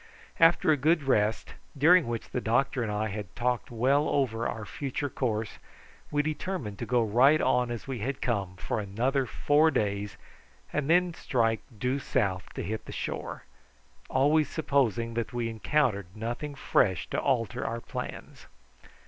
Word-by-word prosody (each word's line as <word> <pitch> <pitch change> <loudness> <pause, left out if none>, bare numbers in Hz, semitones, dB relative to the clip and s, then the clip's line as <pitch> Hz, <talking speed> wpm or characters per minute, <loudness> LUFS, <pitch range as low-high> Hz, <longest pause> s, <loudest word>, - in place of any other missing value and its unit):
After 165 -1 +5
a 150 - +3
good 155 +3 +2
rest, 110 -5 +1 0.2
during 165 +2 +6
which 115 -1 -4
the 125 - -2
doctor 125 +3 +1
and 110 -3 -2
I 105 +1 -1
had 100 -2 -6
talked 125 0 -1
well 130 +5 +2
over 120 -5 0
our 110 -2 -5
future 140 +4 -4
course, 110 -4 -2 0.5
we 145 0 +1
determined 150 - -4
to - - -4
go 120 -1 +3
right 125 +8 +5
on 125 -4 +2
as 120 +1 -5
we 130 -3 -4
had 130 +5 -3
come 100 -6 -1
for 95 - -3
another 125 +7 0
four 150 +2 +3
days 100 -6 -1 0.6
and 150 -1 -1
then 175 +1 +4
to 170 - -13
strike 115 -4 +1 0.2
due 130 +5 0
south 95 -7 -1
to - - -4
hit 110 +1 -4
the - - -8
shore, - - -5 0.7
always 145 +2 +3
supposing 120 -7 0
that 115 +1 -3
we 120 -1 -1
encountered 115 - 0
nothing 120 +6 -4
fresh 95 - +1
to - - 0
alter 120 -7 0
our 115 +1 -3
plans. 90 - -7
120 Hz, 165 wpm, -28 LUFS, 110-140 Hz, 0.7 s, during